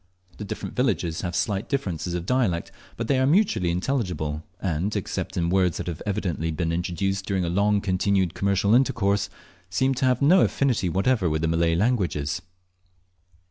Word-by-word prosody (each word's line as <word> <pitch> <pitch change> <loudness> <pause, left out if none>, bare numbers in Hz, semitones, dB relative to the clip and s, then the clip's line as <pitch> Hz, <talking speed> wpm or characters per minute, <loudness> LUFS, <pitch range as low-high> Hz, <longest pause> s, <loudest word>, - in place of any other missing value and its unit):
The - - -4
different - - -6
villages 90 -10 0
have 85 -2 -3
slight 100 +2 -1
differences 90 - -2
of 85 -1 -3
dialect, 105 -8 0 0.3
but 115 - -3
they 135 +1 +2
are 130 - +3
mutually 160 - +2
intelligible, 90 - -2 0.2
and, 95 +3 -1
except 95 -1 -3
in 85 -1 0
words 90 -3 +2
that - - -4
have 85 -3 -5
evidently 90 -6 -1
been 80 +1 -1
introduced 90 +3 -2
during 95 -3 0
a - - -1
long 100 +3 +2
continued 95 -2 +1
commercial 100 +2 +1
intercourse, 100 -5 +2 0.4
seem 130 +8 +1
to 130 - -1
have 125 -1 +3
no 170 +7 +5
affinity 120 -10 +1
whatever 95 +1 +1
with 80 +1 -1
the - - +2
Malay 85 0 +2
languages. 90 - 0
95 Hz, 170 wpm, -25 LUFS, 85-110 Hz, 0.4 s, no